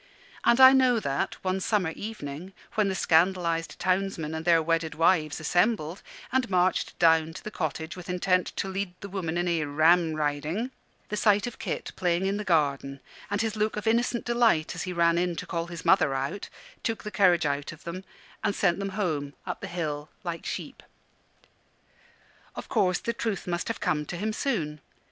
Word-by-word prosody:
And 235 - +4
I 260 0 +10
know 255 -3 +4
that, 140 +1 -2
one 185 0 0
summer 190 -4 +1
evening, 180 -3 -7 0.2
when 215 -2 +2
the 190 - -1
scandalised 170 -1 +2
townsmen 185 -4 -1
and 160 0 -4
their 170 -1 +5
wedded 165 0 0
wives 160 -2 +2
assembled, 175 +1 +1 0.3
and 260 -3 +1
marched 185 0 +1
down 160 -1 +4
to - - -9
the 215 - -6
cottage 160 -1 -3
with 180 -1 -10
intent 180 0 +1
to - - -2
lead 190 -1 -3
the 200 - -7
woman 175 -4 -3
in 175 +1 0
a 170 -1 +1
"Ramriding," 155 - +1 0.4
the 210 - -2
sight 210 0 +3
of 245 - -7
Kit - - -4
playing 180 0 +1
in 195 +1 0
the 210 - -3
garden, 140 -6 +1 0.3
and 205 +1 0
his 220 -1 -2
look 215 0 0
of 210 - -4
innocent 235 +1 +1
delight 235 -10 +2
as 180 - -5
he 185 - -4
ran 170 -1 +3
in 175 -1 0
to 180 - -5
call 170 -1 -3
his 170 -1 -8
mother 145 -8 +4
out, 135 +9 -3 0.3
took 225 -2 -2
the 210 - -5
courage 185 -4 +4
out 145 0 -1
of 155 - -13
them 175 +3 -6 0.4
and 205 -1 +1
sent 175 -2 +2
them 200 0 -2
home, 150 -8 -2
up - - -5
the - - -5
hill, 155 -4 -4
like 170 -2 -5
sheep. - - -5 1.7
Of - - -7
course 185 -2 +2
the 235 - -3
truth 220 -4 -3
must 175 -1 -2
have 230 - -3
come 150 -1 0
to 175 - -5
him 215 +4 -2
soon. 160 - -2
180 Hz, 190 wpm, -27 LUFS, 160-200 Hz, 1.7 s, I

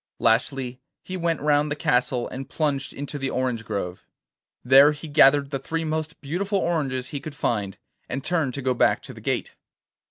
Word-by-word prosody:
Lastly 125 +2 +1 0.2
he 185 - -6
went 170 -3 -1
round 150 0 +2
the 145 - -1
castle, 125 -3 +1
and 135 +1 -7
plunged 145 -4 -1
into 145 +1 -6
the 135 0 -1
orange 125 -3 -1
grove. 100 -4 -4 0.6
There 135 +4 +7
he 150 +2 -9
gathered 145 -1 +5
the 135 - -2
three 160 +5 -3
most 160 0 -3
beautiful 185 +8 -1
oranges 140 -8 -1
he 145 - -4
could 150 +1 -8
find, 105 -8 -1 0.3
and 135 +1 -3
turned 155 -5 0
to 140 - -5
go 130 0 +2
back 120 - +2
to - - -9
the - - -12
gate. - - -2
140 Hz, 185 wpm, -24 LUFS, 130-155 Hz, 0.6 s, There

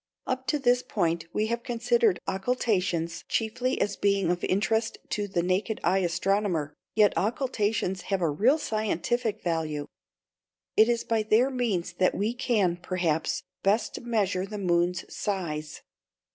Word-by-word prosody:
Up 260 0 -3
to 300 - +2
this 250 -3 +3
point 170 -7 -1
we 215 - 0
have 235 +1 -2
considered 400 - +2
occultations 190 -6 0
chiefly 245 +3 0
as 200 0 0
being 200 -3 +2
of 175 0 -2
interest 220 +4 +1
to 205 -1 -1
the 175 -3 -1
naked 190 +5 0
eye 185 +2 +3
astronomer. 175 -3 0 0.2
Yet 210 -2 +5
occultations 210 -4 0
have 195 -1 +1
a 170 - +1
real 235 - +3
scientific 220 - -1
value. 155 -4 -1 0.9
It 220 +2 +6
is 235 -1 +1
by 225 -1 +1
their 220 +5 +3
means 210 -9 -1
that 185 - +3
we 210 +4 0
can, 215 -8 +1
perhaps, 175 -3 -1 0.2
best 210 +3 +1
measure 200 -6 0
the 210 +1 -6
moon's 180 -1 +1
size. 160 -7 -3
200 Hz, 145 wpm, -27 LUFS, 175-230 Hz, 0.9 s, It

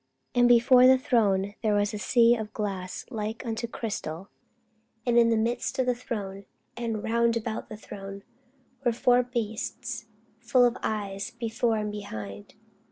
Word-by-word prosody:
And 245 -1 +5
before 245 +1 +7
the 260 0 +7
throne 205 -7 +1
there 215 -2 +2
was 205 0 +1
a 210 - -4
sea 235 +2 +4
of 220 -2 -5
glass 195 -4 -4
like 220 +2 -4
unto 230 0 -3
crystal: 195 -6 -5 0.8
and 240 -1 +2
in 235 -1 +6
the 225 - +3
midst 235 +2 -1
of 260 - +2
the 250 - +2
throne, 200 -5 -6 0.3
and 230 -3 -3
round 235 +1 +2
about 225 -1 -4
the 215 - -7
throne, 195 -1 -9 0.6
were 240 -2 +2
four 245 +1 +4
beasts 235 -3 -4 0.3
full 250 -2 +4
of 240 0 +2
eyes 200 -2 -3
before 230 -1 -1
and 210 -1 -2
behind. 105 - -7
225 Hz, 160 wpm, -27 LUFS, 205-240 Hz, 0.8 s, before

